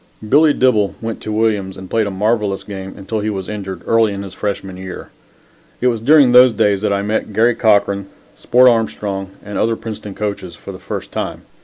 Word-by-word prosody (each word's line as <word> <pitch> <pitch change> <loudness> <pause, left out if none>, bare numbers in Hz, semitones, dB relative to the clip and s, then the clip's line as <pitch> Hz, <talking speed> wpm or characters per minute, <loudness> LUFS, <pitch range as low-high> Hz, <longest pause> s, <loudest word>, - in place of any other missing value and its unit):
Billy 150 +6 +5
Dibble 125 -8 +2
went 115 -1 -5
to 110 - -5
Williams 105 -3 0
and 95 - -9
played 110 +2 0
a - - -2
marvelous 105 0 0
game 95 -2 -8
until 110 +3 -4
he 105 +1 -2
was 95 -3 -4
injured, 100 -3 -6
early 115 -2 +3
in 100 0 -5
his 95 - -9
freshman 95 -2 -4
year. 95 0 -8 0.7
It 125 - +3
was 115 -3 -2
during 140 0 +5
those 125 0 +7
days 100 -2 +1
that 105 - 0
I 100 0 0
met 105 0 -2
Garry 115 +4 +3
Cochran, 100 -3 +2 0.3
Sport 125 +1 +4
Armstrong 105 -4 0 0.2
and 105 0 -4
other 115 0 +1
Princeton 110 -3 -7
coaches 100 -4 -4
for - - -9
the - - -10
first - - -6
time. - - -4
105 Hz, 200 wpm, -17 LUFS, 100-115 Hz, 0.7 s, those